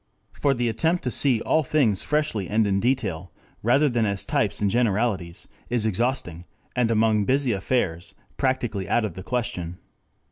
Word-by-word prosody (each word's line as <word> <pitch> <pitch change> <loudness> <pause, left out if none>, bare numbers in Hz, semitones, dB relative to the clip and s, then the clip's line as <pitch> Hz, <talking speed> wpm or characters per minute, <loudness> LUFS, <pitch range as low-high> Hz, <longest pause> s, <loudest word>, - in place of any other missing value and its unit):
For 140 -1 0
the 120 0 0
attempt 160 +10 0
to 125 - -1
see 125 -2 +3
all 160 - +2
things 130 -9 +1
freshly 150 - -1
and 110 +1 +2
in 100 -1 +1
detail, 95 -8 -1 0.3
rather 135 +7 +3
than 120 -4 +1
as 100 -2 -1
types - - 0
and 105 - +1
generalities, 105 -5 0 0.2
is 120 -2 +1
exhausting, 110 -6 -1 0.3
and 125 -2 +2
among 110 -2 +2
busy 135 +1 +2
affairs 95 -3 -2 0.2
practically 120 -8 -1
out 120 - +2
of 100 - -4
the 95 - -8
question. 95 -7 -3
115 Hz, 165 wpm, -24 LUFS, 100-125 Hz, 0.3 s, see